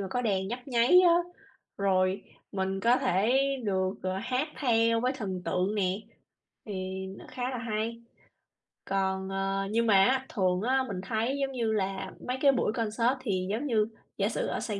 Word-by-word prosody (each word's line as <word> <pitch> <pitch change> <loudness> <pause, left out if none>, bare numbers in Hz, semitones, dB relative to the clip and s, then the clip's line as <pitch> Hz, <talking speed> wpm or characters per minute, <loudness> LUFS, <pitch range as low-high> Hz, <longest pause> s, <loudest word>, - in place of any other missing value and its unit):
mà 195 - -3
có 245 - -1
đèn 195 -4 0
nhấp 250 +3 -6
nháy 245 +9 +6
á, 345 -2 +6 0.6
rồi 190 -1 +2 0.3
mình 190 0 -1
có 235 +3 +4
thể 225 -3 +2 0.3
được, 190 -1 0
ờ, 185 0 -1
hát 255 +5 -1
theo 230 -3 +3
với 255 +2 +1
thần 190 -8 -4
tượng 185 +4 0
nè, 190 0 0 0.7
thì 190 -2 -4
nó - - -12
khá 255 0 -3
là 255 - -4
hay. 230 0 -3 0.8
Còn, 190 0 -1
ờ, 195 0 -1
nhưng 230 +1 +2
mà 210 - +5
á, 265 +1 +2
thường 185 -3 +1
á 260 +3 +2
mình 185 -2 -4
thấy 235 +5 -1
giống 270 0 0
như 230 -4 -1
là 195 -2 -2 0.2
mấy 255 +1 -1
cái 280 -1 +6
buổi 240 -4 0
concert 230 +2 +1
thì 185 -6 -1
giống 250 +7 -2
như 215 -3 +2 0.3
giả 200 +1 +1
sử - - -2
ở - - -2
Sài 205 -3 -3
215 Hz, 185 wpm, -29 LUFS, 190-245 Hz, 0.8 s, nháy